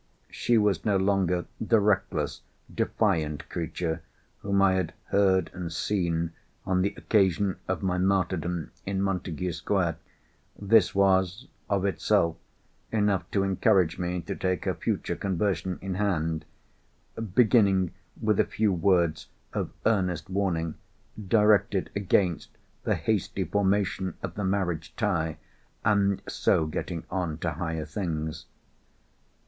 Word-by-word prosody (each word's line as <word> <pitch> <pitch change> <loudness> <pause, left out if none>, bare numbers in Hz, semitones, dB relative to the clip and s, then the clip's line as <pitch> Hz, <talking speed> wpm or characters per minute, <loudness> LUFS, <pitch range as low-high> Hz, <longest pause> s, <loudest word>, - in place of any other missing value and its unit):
She 120 - +2
was 105 -5 +2
no 100 -2 +2
longer 95 -2 +1
the 110 0 +3
reckless, 100 -2 0 0.3
defiant 75 -2 0
creature 80 -1 -3 0.4
whom 100 -1 0
I 95 -1 +5
had 95 -3 -1
heard 95 -3 +3
and 90 -2 -5
seen, 85 -2 -1 0.3
on 95 0 +1
the 100 - 0
occasion 95 -2 +2
of 95 +1 -2
my 90 -1 0
martyrdom 90 -3 0
in 95 0 -2
Montagu 90 -3 -1
Square. 85 0 0 0.6
This 105 -1 +4
was, 95 +2 +2 0.2
of 100 -1 +1
itself, 95 -3 +2 0.6
enough 105 -3 +1
to 100 - +1
encourage 95 -3 +2
me 90 0 -2
to 80 - -5
take 95 -1 -1
her - - +1
future - - -2
conversion 95 -2 -1
in 95 -1 -2
hand—beginning 95 +3 0 0.3
with 110 -2 +1
a - - +6
few 105 -3 0
words 85 -4 +2 0.3
of - - -2 0.2
earnest 90 -7 +1
warning 85 -5 0 0.5
directed 105 -2 +3
against 95 -3 +1 0.4
the - - +2
hasty - - -1
formation 100 -2 0
of - - -4
the 100 - -3
marriage 90 -4 -1
tie, 80 -7 0 0.5
and 100 -2 +2
so 80 - +2
getting 80 +2 -4
on 90 -4 -2
to 85 0 -2
higher 80 0 -3
things. 80 -6 -4
95 Hz, 125 wpm, -27 LUFS, 85-100 Hz, 0.6 s, a